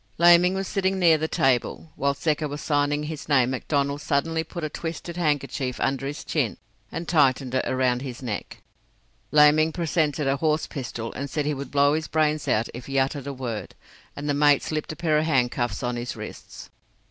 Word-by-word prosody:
Laming 175 +2 +6
was 195 0 -2
sitting 195 -1 0
near 165 -4 +5
the 160 - -1
table. 135 +3 0
While 140 0 0
Secker 150 +1 0
was 145 +1 -6
signing 145 0 0
his 150 -1 -6
name 130 -3 +4
McDonnell 140 +2 -1
suddenly 160 +3 0
put 170 +1 -7
a - - 0
twisted 165 +2 -6
handkerchief 140 -5 -1
under 135 0 -1
his 145 - -5
chin - - -1 0.3
and 165 0 -5
tightened 135 -5 +2
it 130 - +1
round 125 -1 +1
his 130 -1 -7
neck. 110 -5 -5 0.7
Laming 150 +1 +5
presented 155 -3 0
a 135 +1 +1
horse 155 +1 +1
pistol 120 -4 -6
and 140 +1 -5
said 145 +3 -2
he 150 - 0
would 140 -2 -6
blow 145 +1 +3
his 155 0 -1
brains 155 -1 +1
out 110 +1 +1
if 120 +1 -8
he 135 0 -2
uttered 135 +1 0
a 140 - -3
word, 120 -5 -5 0.4
and 145 +1 -5
the 145 - +1
mate 145 -1 +4
slipped 155 -1 -3
a - - -6
pair 155 -3 +1
of 155 - 0
handcuffs 125 -4 0
on 120 0 -1
his 120 +1 -4
wrists. - - -10
145 Hz, 195 wpm, -25 LUFS, 135-155 Hz, 0.7 s, Laming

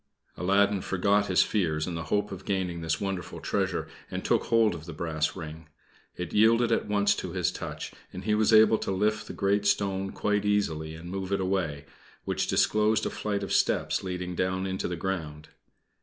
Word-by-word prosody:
Aladdin 100 +2 +2
forgot 100 +3 +1
his 90 - +4
fears 80 -7 0
in 90 - -4
the 80 -1 -4
hope 105 +5 0
of 95 -1 -7
gaining 90 -4 -2
this 80 -1 -1
wonderful 95 -4 -4
treasure, - - -1 0.2
and - - -5
took - - +2
hold 115 -3 +3
of 80 -2 -8
the 85 - -6
brass 80 -1 -1
ring. 80 0 -8 0.5
It 90 -2 -5
yielded 115 +2 +4
at 115 - +1
once 100 -1 +3
to - - -5
his - - +1
touch, - - -6 0.2
and 90 - -7
he 105 - +1
was 110 +1 +3
able 110 0 +6
to - - -4
lift 105 +3 0
the - - -6
great 100 +1 +1
stone 95 -1 0
quite 105 -1 0
easily 80 -7 0
and 85 +2 -9
move 95 0 -4
it 100 - +1
away, 90 -7 -1 0.4
which - - -1
disclosed 110 +1 +2
a - - -1
flight 100 -1 -2
of 100 - -3
steps, - - +1
leading 90 -1 -4
down 95 +1 -1
into 95 0 -2
the 90 - -3
ground. 80 -4 -4
95 Hz, 195 wpm, -28 LUFS, 85-105 Hz, 0.5 s, able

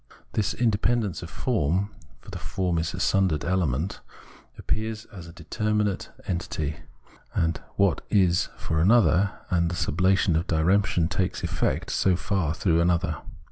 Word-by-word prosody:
This 110 0 0
independence 115 -3 +1
of 85 - -7
form, 95 - 0 0.3
for - - -12
the - - -6
form 90 -3 -1
is 80 +2 -2
a - - -6
sundered 90 -4 +2
element, 85 -2 0 0.6
appears 110 0 -3
as 90 -4 -9
a - - -10
determinate 105 +4 -1 0.2
entity, 80 -4 -3 0.6
as 80 -1 +2 0.2
what 100 -3 +2
is 90 -4 +3
for 80 - -1
another, 100 -1 +4 0.2
and 85 -2 +2
the 85 - -3
sublation 90 +2 +2
of 85 +3 0
diremption 85 +1 +2
takes 95 +1 -2
effect - - -1
so 95 -2 +2
far 85 -4 -1
through 85 -2 +2
another. 85 0 +1
90 Hz, 140 wpm, -26 LUFS, 85-100 Hz, 0.6 s, another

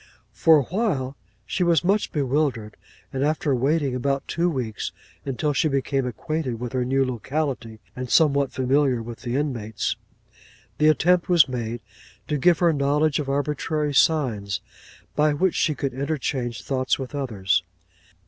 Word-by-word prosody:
'For 160 -1 +5
a 145 - +2
while, 150 - -1 0.3
she 180 - -1
was 170 -3 +3
much 200 +4 +1
bewildered; 135 -6 -1 0.4
and 135 0 -1
after 150 -1 +1
waiting 140 +2 +1
about 135 +2 -1
two 170 +2 +1
weeks, 125 -9 -3 0.3
until 145 +3 -1
she 155 +4 +2
became 135 -2 0
acquainted 140 -2 -3
with 125 +1 -5
her 130 -1 +1
new 135 +2 +2
locality, 130 -2 -3 0.2
and 125 -1 -5
somewhat 140 -3 +3
familiar 130 0 +2
with 115 0 -8
the 120 -1 -3
inmates, 120 -7 -2 0.8
the 150 - +5
attempt 175 +4 +3
was 170 -4 +6
made 120 -2 -4 0.5
to 150 -1 -1
give 175 +3 +4
her 170 +1 +3
knowledge 145 +1 +1
of 140 -2 -3
arbitrary 150 +1 -1
signs, 115 - +2 0.6
by 150 0 +3
which 185 +4 +2
she 155 - +1
could 140 -2 -3
interchange 130 - -2
thoughts 130 -2 0
with 135 +1 -6
others. 105 -11 0
140 Hz, 150 wpm, -24 LUFS, 125-155 Hz, 0.8 s, was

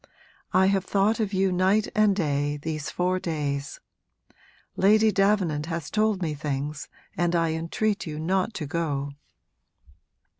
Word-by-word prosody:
I 185 +1 +4
have 195 -1 +2
thought 200 +4 +1
of 210 -3 0
you, 190 -1 +1
night 190 +4 +2
and 215 -2 +4
day, 145 -4 0
these 155 0 -4
four 180 +1 0
days. 145 -4 -3 1.0
Lady 215 +3 +4
Davenant 190 -7 +1
has 165 -3 -4
told 215 -3 +1
me 155 -2 -1
things, 145 0 -4 0.3
and 175 0 +1
I 165 -1 +2
entreat 165 +6 -1
you 150 -1 -5
not 185 +7 0
to 155 - -3
go!' 145 -3 -2
175 Hz, 140 wpm, -26 LUFS, 150-195 Hz, 1.0 s, I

